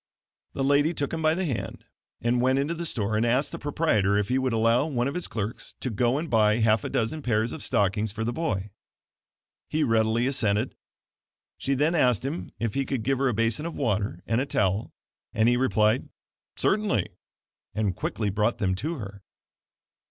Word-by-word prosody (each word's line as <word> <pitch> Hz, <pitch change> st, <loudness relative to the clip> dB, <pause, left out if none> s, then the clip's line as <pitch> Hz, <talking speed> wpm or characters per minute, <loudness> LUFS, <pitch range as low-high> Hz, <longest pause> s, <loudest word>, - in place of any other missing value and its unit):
The 135 Hz, -, -2 dB
lady 145 Hz, +4 st, +3 dB
took 140 Hz, +1 st, -2 dB
him 165 Hz, -, -2 dB
by 155 Hz, 0 st, +3 dB
the 190 Hz, +1 st, -1 dB
hand 135 Hz, -8 st, -4 dB, 0.4 s
and 120 Hz, +1 st, +1 dB
went 130 Hz, +1 st, +3 dB
into 140 Hz, +4 st, 0 dB
the 170 Hz, 0 st, -2 dB
store, 110 Hz, -6 st, -1 dB
and 110 Hz, -, +2 dB
asked 125 Hz, +4 st, +1 dB
the -, -, -6 dB
proprietor 110 Hz, -10 st, +1 dB
if 105 Hz, -1 st, 0 dB
he 130 Hz, +1 st, +2 dB
would 130 Hz, -1 st, 0 dB
allow 115 Hz, +5 st, +3 dB
one 125 Hz, -4 st, 0 dB
of 140 Hz, -, -2 dB
his 180 Hz, -, -2 dB
clerks 110 Hz, +2 st, -5 dB
to 130 Hz, -, -3 dB
go 120 Hz, +4 st, +1 dB
and 160 Hz, +3 st, -3 dB
buy 110 Hz, -5 st, +3 dB
half 110 Hz, -2 st, +3 dB
a -, -, -3 dB
dozen 120 Hz, +7 st, -1 dB
pairs 115 Hz, -3 st, 0 dB
of -, -, -6 dB
stockings 105 Hz, +2 st, +1 dB
for 110 Hz, +2 st, -4 dB
the 120 Hz, +2 st, -1 dB
boy. 105 Hz, -, -2 dB, 1.0 s
He 155 Hz, 0 st, +1 dB
readily 115 Hz, -1 st, +2 dB
assented. 115 Hz, -4 st, +1 dB, 0.9 s
She 140 Hz, -, 0 dB
then 150 Hz, +5 st, +2 dB
asked 125 Hz, -, +2 dB
him 150 Hz, +5 st, -4 dB
if 115 Hz, -3 st, -2 dB
he 135 Hz, -, 0 dB
could 130 Hz, -4 st, -3 dB
give 135 Hz, +3 st, 0 dB
her 135 Hz, -, +2 dB
a 125 Hz, -, +1 dB
basin 115 Hz, +8 st, +1 dB
of 170 Hz, -, -6 dB
water 100 Hz, -, -1 dB
and 115 Hz, +2 st, +1 dB
a 140 Hz, -, -2 dB
towel, 100 Hz, -2 st, 0 dB, 0.4 s
and 110 Hz, +1 st, +3 dB
he 120 Hz, -, +4 dB
replied: 110 Hz, -4 st, +2 dB, 0.5 s
"Certainly," 200 Hz, -, +1 dB, 0.7 s
and 105 Hz, -4 st, 0 dB
quickly 105 Hz, +1 st, -2 dB
brought 105 Hz, +4 st, +1 dB
them 95 Hz, -4 st, 0 dB
to 150 Hz, -, -3 dB
her. 100 Hz, -6 st, -8 dB
120 Hz, 195 wpm, -26 LUFS, 105-140 Hz, 1.0 s, he